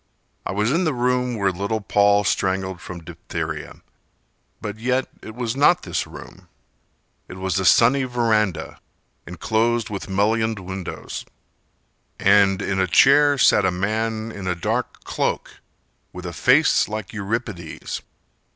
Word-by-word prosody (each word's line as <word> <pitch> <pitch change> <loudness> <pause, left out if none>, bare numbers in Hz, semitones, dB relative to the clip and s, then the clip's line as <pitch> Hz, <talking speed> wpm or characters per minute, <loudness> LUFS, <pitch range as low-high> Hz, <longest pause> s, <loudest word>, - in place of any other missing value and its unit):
I - - -2
was 105 +4 0
in 170 +5 +2
the 155 -5 0
room 125 0 0
where 100 -3 +1
little 100 +4 -2
Paul 100 0 +3
Strangled 95 -2 -1
from 85 -2 -8
diphtheria, - - -6 0.8
But 105 0 -6
yet 125 +2 0
it 110 - -10
was 120 -1 -3
not 160 +6 +4
this - - -2
room— - - -12 0.8
It - - -9
was 95 0 -1
a 95 - -1
sunny 130 +6 +5
verandah 110 -6 0 0.5
enclosed 110 +5 0
With 100 -1 -5
mullioned 110 +3 +1
windows 95 -1 -6 1.0
And 100 -1 +4
in 95 0 -1
a 95 - +2
chair 145 +8 +5
sat - - +5
a 95 - +3
man 110 +4 -2
in 100 -4 -7
a 90 - 0
dark 85 - -3
cloak - - -3 0.5
With 90 0 -8
a 85 - -5
face 145 - +4
like 110 -1 -5
Euripides. 105 -5 -4
105 Hz, 140 wpm, -22 LUFS, 95-120 Hz, 1.0 s, sunny